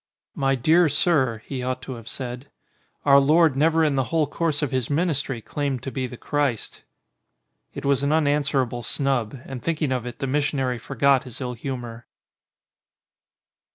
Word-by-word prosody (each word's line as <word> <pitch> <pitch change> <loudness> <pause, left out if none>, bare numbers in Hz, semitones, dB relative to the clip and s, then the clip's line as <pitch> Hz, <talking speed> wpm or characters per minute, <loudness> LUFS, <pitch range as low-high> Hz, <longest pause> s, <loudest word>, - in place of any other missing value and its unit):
'My 135 0 +1
dear 160 +6 +4
Sir,' 135 -7 +1
he 135 -2 -4
ought 130 0 -3
to 130 - -6
have 115 -2 -10
said, 125 +1 -6 0.6
'Our 140 -1 +7
Lord 155 +1 +4
never 160 +3 +3
in 150 -2 +2
the 135 -2 +1
whole 160 +1 +1
course 155 0 -1
of 145 - -1
his 130 -3 -1
ministry 145 -6 0
claimed 135 +1 -3
to 135 - -4
be 130 -1 -2
the 125 - -10
Christ." 145 -6 -2 0.9
It - - -6
was 140 -1 +2
an 140 +1 +1
unanswerable 145 -5 +1
snub, 135 -1 -1
and 130 -2 -7
thinking 155 -1 -1
of 125 -2 -2
it 120 - -7
the - - -3
missionary 135 -3 0
forgot 135 +2 +2
his 125 - -9
ill 125 -2 -3
humour. 120 -2 -6
135 Hz, 165 wpm, -24 LUFS, 125-145 Hz, 0.9 s, Our